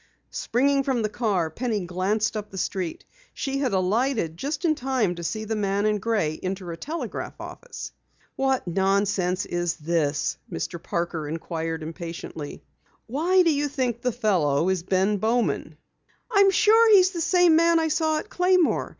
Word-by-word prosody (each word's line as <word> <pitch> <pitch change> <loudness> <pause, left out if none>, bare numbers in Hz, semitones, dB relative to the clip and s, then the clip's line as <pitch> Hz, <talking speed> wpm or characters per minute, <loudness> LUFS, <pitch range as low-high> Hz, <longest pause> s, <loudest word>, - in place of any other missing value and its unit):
Springing 275 +4 +1
from 260 -4 0
the 215 - 0
car, 200 -8 0
Penny 215 0 -2
glanced 195 +5 0
up 210 -1 -4
the 190 - -9
street. 185 -2 -3 0.3
She 275 0 -2
had 265 -4 0
alighted 195 - 0
just 285 - -3
in 320 - +4
time 255 -9 0
to 170 -1 -8
see 215 +6 -3
the 220 +1 -2
man 200 0 0
in 210 -1 +1
gray 195 -8 -1
enter 185 -1 -4
a - - -5
telegraph 315 - -5
office. - - -8 0.4
"What 265 -5 0
nonsense 190 0 +1
is 175 -1 -1
this?" 155 -2 -1
Mr. 165 - -4
Parker 170 -3 -3
inquired 165 0 -4
impatiently. 165 -2 -7 0.4
"Why 340 +10 +3
do 330 -2 +3
you 290 0 0
think 250 -4 -2
the 250 - 0
fellow 180 - +1
is 190 -2 0
Bowman?" 205 +6 0 0.5
"I'm 400 -2 +6
sure 440 +3 +5
he's 370 -1 +5
the 345 -3 -4
same 355 -1 +4
man 335 +1 +4
I 320 -1 0
saw 315 0 +1
at - - -5
Claymore. 360 -1 +2
215 Hz, 160 wpm, -25 LUFS, 175-280 Hz, 0.5 s, I'm